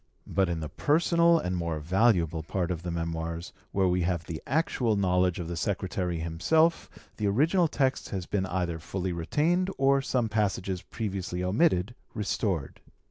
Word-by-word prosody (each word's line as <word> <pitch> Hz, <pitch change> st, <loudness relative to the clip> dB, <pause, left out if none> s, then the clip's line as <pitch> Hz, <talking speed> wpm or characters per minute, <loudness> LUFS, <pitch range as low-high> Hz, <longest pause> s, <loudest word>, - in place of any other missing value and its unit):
But 95 Hz, -2 st, +1 dB
in 85 Hz, -2 st, -2 dB
the 75 Hz, -, -3 dB
personal 170 Hz, -, +3 dB
and 90 Hz, -, -2 dB
more 85 Hz, -3 st, -2 dB
valuable 85 Hz, -1 st, +2 dB
part 90 Hz, +3 st, -2 dB
of 85 Hz, -2 st, -3 dB
the 90 Hz, -, -5 dB
Memoirs, 85 Hz, 0 st, -4 dB, 0.2 s
where 95 Hz, -1 st, +2 dB
we 90 Hz, 0 st, +1 dB
have 85 Hz, -1 st, -1 dB
the 80 Hz, -2 st, -6 dB
actual 130 Hz, -6 st, +1 dB
knowledge 90 Hz, -2 st, +2 dB
of 85 Hz, -, -4 dB
the 85 Hz, -, -4 dB
secretary 90 Hz, -1 st, -2 dB
himself, 95 Hz, -, +1 dB, 0.3 s
the 105 Hz, -, 0 dB
original 160 Hz, -, +3 dB
text 135 Hz, -3 st, 0 dB
has 95 Hz, -3 st, -4 dB
been 95 Hz, -1 st, -1 dB
either 90 Hz, -3 st, -2 dB
fully 90 Hz, +2 st, -3 dB
retained, 160 Hz, -, +1 dB
or 135 Hz, 0 st, +4 dB
some 130 Hz, -2 st, 0 dB
few 105 Hz, -, -12 dB
passages 95 Hz, -3 st, 0 dB
previously 95 Hz, -4 st, -4 dB
omitted 100 Hz, -, +2 dB, 0.2 s
restored. 100 Hz, -, -2 dB
95 Hz, 165 wpm, -28 LUFS, 85-120 Hz, 0.3 s, or